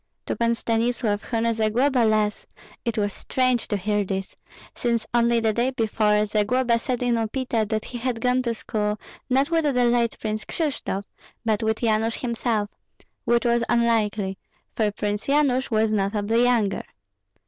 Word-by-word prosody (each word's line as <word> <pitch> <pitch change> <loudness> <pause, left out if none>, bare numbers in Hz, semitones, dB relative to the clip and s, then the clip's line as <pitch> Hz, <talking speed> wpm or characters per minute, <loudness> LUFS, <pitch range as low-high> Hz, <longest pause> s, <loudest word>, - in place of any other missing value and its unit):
To - - -2
Pan 235 0 +1
Stanislav, 230 -2 0
who 230 -2 -2
knew 230 0 +2
Zagloba 235 +5 +2
less, 215 -1 0 0.4
it 235 -2 -2
was 205 -1 0
strange 255 -2 0
to 205 - -1
hear 205 +2 0
this, 195 0 -4 0.4
since 235 -2 -1
only 235 0 +3
the 220 -1 +1
day 240 +4 +1
before, 215 -4 +1
Zagloba 230 +3 +1
said 250 +1 -2
in 240 -2 +2
Upita 225 -1 -1
that 220 -1 -1
he 245 - -6
had 245 -1 -2
gone 250 +2 +2
to 235 -2 -1
school, 210 -1 -2 0.3
not 270 +5 +2
with 330 -1 +2
the 255 -5 +2
late 235 -1 +2
Prince 215 0 -3
Kryshtof, 280 - -3 0.4
but 220 -1 +1
with 220 +1 -1
Yanush 225 0 +1
himself, 230 -3 -1 0.5
which 235 +1 +2
was 235 0 +3
unlikely, 215 -5 +1 0.4
for 215 -2 +2
Prince 205 0 -3
Yanush 275 -2 +2
was 220 -1 +2
notably 210 +2 +1
younger. 225 -6 +1
230 Hz, 160 wpm, -24 LUFS, 215-245 Hz, 0.5 s, only